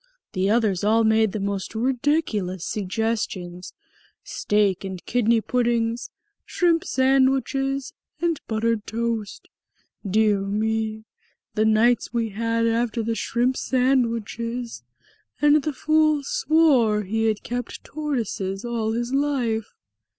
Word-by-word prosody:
The 190 +1 +1
others 210 -4 +1
all 220 +2 +3
made 220 -1 +3
the 215 - -3
most 200 +1 -3
ridiculous 235 - 0
suggestions. 195 -4 -3 0.5
Steak 205 -3 0
and 190 -2 -7
kidney 235 -1 +2
puddings 235 -1 0 0.3
shrimp 340 -1 +1
sandwiches 270 -1 +1 0.3
and 335 -3 0
buttered 225 -1 -1
toast. 230 -2 -3 0.6
Dear 210 0 +2
me! 220 +2 -1 0.5
The 215 - +1
nights 225 +3 +3
we 230 -2 -1
had 230 +2 -1
after 230 0 0
the 230 +1 -1
shrimp 240 +3 0
sandwiches! 235 - -1 0.6
And 295 0 +5
the 305 - -2
fool 310 0 +2
swore 270 -9 +3
he 225 +3 -1
had 215 -2 0
kept 245 0 -5
tortoises 235 -9 -3
all 225 -2 -1
his 240 +2 -2
life!" 255 -6 -1
230 Hz, 115 wpm, -24 LUFS, 215-255 Hz, 0.6 s, And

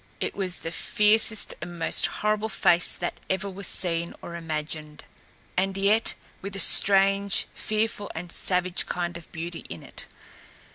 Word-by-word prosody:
It - - -3
was 185 -3 0
the 165 - -6
fiercest 215 +3 +3
and 175 +1 -7
most 165 - +3
horrible 215 +1 -1
face 175 -3 +4
that - - -4
ever 190 +1 -1
was 195 -1 -3
seen 170 -1 +1
or 170 - -8
imagined, 155 -2 -5 0.5
and 190 +1 0
yet 205 +3 +2 0.3
with 195 0 -6
a - - -2
strange, 195 0 +4
fearful 215 -1 -2
and 170 +1 -6
savage 180 0 +1
kind 175 -1 -3
of 170 -1 -10
beauty 170 +1 -6
in 85 - -8
it. - - -4
185 Hz, 150 wpm, -26 LUFS, 170-200 Hz, 0.5 s, face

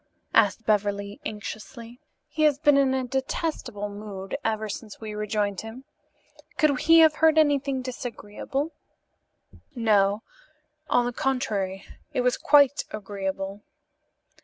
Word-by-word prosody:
asked 215 0 +3
Beverly 205 -1 0
anxiously. 225 +3 -8 0.3
"He 310 - -4
has 300 -3 +4
been 290 -1 +4
in 270 -1 +3
a 260 - 0
detestable 260 -4 -3
mood 200 -2 -7
ever 220 -1 -1
since 210 +1 -7
we 215 -1 -6
rejoined 210 -2 -1
him. 225 +4 -9 0.7
Could 300 -6 +3
he 330 0 +6
have 315 -1 +5
heard 320 0 +4
anything 280 -3 +2
disagreeable?" 255 +4 -4 1.0
"No; 210 -3 +2 0.7
on 245 - +3
the 245 - -2
contrary, 205 -8 -2 0.3
it 255 - +1
was 250 0 +2
quite 285 -1 +4
agreeable." 195 -1 -5
225 Hz, 120 wpm, -26 LUFS, 205-270 Hz, 1.0 s, he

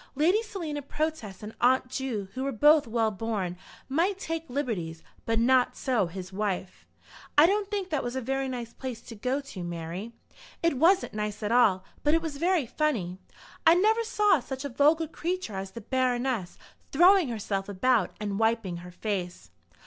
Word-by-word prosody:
Lady 345 +10 +3
Selina 335 -9 -5
Protest 285 -9 -4
and 210 +1 -7
Aunt 255 +1 +4
Ju, 250 -6 -3
who 260 - -3
were 275 - -1
both 295 +4 +5
well 225 -1 +1
born, 200 -3 -3 0.3
might 340 +8 +1
take 330 -4 -4
liberties; 205 - -3 0.2
but 225 0 +1
not 250 +2 +3
so 240 -8 +1
his 185 +2 -8
wife. 190 -2 -3 0.5
"I 295 - +9
don't 400 +2 +1
think 400 -3 -3
that 300 - 0
was 245 +1 -4
a - - 0
very 270 +2 -2
nice 240 -2 -5
place 255 -4 -6
to 230 - -10
go 255 +6 -1
to, 215 -10 -8
Mary." 175 +5 -5 0.5
"It 330 -6 +2
wasn't 360 +5 +4
nice 210 0 -3
at 210 - -1
all, 215 -6 +4 0.2
but 295 +2 +4
it 330 - +2
was 310 -3 -4
very 345 -2 +2
funny. 225 - -1 0.4
I 330 - +7
never 435 +5 +3
saw 420 -6 +3
such 265 +2 -6
a - - -2
vulgar 300 +6 +3
creature 340 - -3
as 190 0 -4
the 230 +4 -9
Baroness, 250 -4 -1 0.3
throwing 350 +1 +6
herself 200 -3 -3
about 210 0 +2
and 205 -1 -3
wiping 225 -5 +1
her 175 +1 -9
face." 180 -2 -4
250 Hz, 180 wpm, -28 LUFS, 210-310 Hz, 0.5 s, I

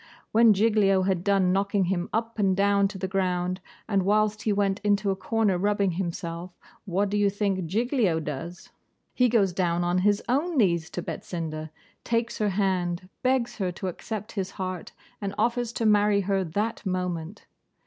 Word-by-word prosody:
When 225 0 +6
Giglio 200 -2 +3
had 185 -2 0
done 195 -2 +3
knocking 200 0 +1
him 175 -1 -1
up 230 0 -2
and 195 -2 +2
down 200 0 +3
to 195 0 -8
the 190 0 -3
ground, 185 -1 -1 0.3
and 200 -3 +2
whilst 210 +2 +2
he 215 - 0
went 200 -1 +1
into 205 -1 +1
a - - -1
corner 195 -1 0
rubbing 200 -1 +1
himself, 170 0 -5 0.3
what 195 +1 0
do 210 - +1
you 205 -1 +3
think 195 -3 -1
Giglio 220 - +1
does? 160 +5 -6 0.4
He 250 -1 +3
goes 200 -6 +2
down 175 -1 0
on 175 +1 +1
his 205 +2 +2
own 300 +6 0
knees 170 -8 +2
to 175 - -5
Betsinda, 155 -3 -5 0.3
takes 235 0 -1
her 210 -1 +2
hand, 185 -2 -1
begs 255 -2 +1
her 190 -4 -1
to 185 +2 -4
accept 215 +4 -6
his 195 -3 -3
heart, 185 -2 -5 0.3
and 200 -1 -3
offers 240 -1 0
to 230 - -2
marry 210 -1 +4
her 195 0 0
that 205 +7 -2
moment. 180 -1 -3
195 Hz, 175 wpm, -26 LUFS, 180-210 Hz, 0.4 s, When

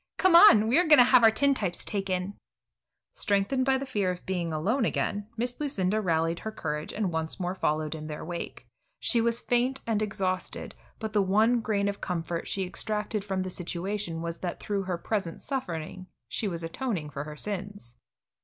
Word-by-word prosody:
Come 370 -2 +5
on; 280 - +9
we 245 +8 +4
are 355 - +2
going 300 -1 +8
to 250 - +9
have 250 -1 +5
our 225 - +9
tintypes 220 -7 0
taken." 195 -1 -2 0.8
Strengthened 205 +6 +1
by 265 0 +3
the 275 - -4
fear 205 -8 0
of 180 -1 -5
being 180 -3 -1
left 160 -1 -2
alone 225 - +1
again, 205 -2 -1
Miss 245 +2 -2
Lucinda 215 -8 0
rallied 165 -2 +1
her 220 - -5
courage, 150 -7 -4
and 210 -4 -1
once 160 +1 -3
more 180 0 -1
followed 155 -4 -1
in 155 -1 -7
their 150 -1 -6
wake. 170 +1 -6 0.3
She 235 - +2
was 235 +1 +1
faint 250 +2 +1
and 220 -2 0
exhausted, 195 -3 -2 0.2
but 220 -2 -5
the 210 - +4
one 215 +5 +3
grain 205 -2 0
of 200 0 -3
comfort 170 -1 -3
she 195 -1 -1
extracted 210 +2 -3
from 190 -2 -2
the 185 - -5
situation 175 -1 -4
was 170 0 -4
that 175 -2 -4
through 205 -1 -2
her 180 -2 -2
present 185 -2 -3
suffering 185 - -4 0.2
she 220 - -2
was 170 -3 -3
atoning 165 - -3
for 140 +1 -5
her 150 0 -8
sins. 200 - -5
195 Hz, 190 wpm, -28 LUFS, 170-225 Hz, 0.8 s, on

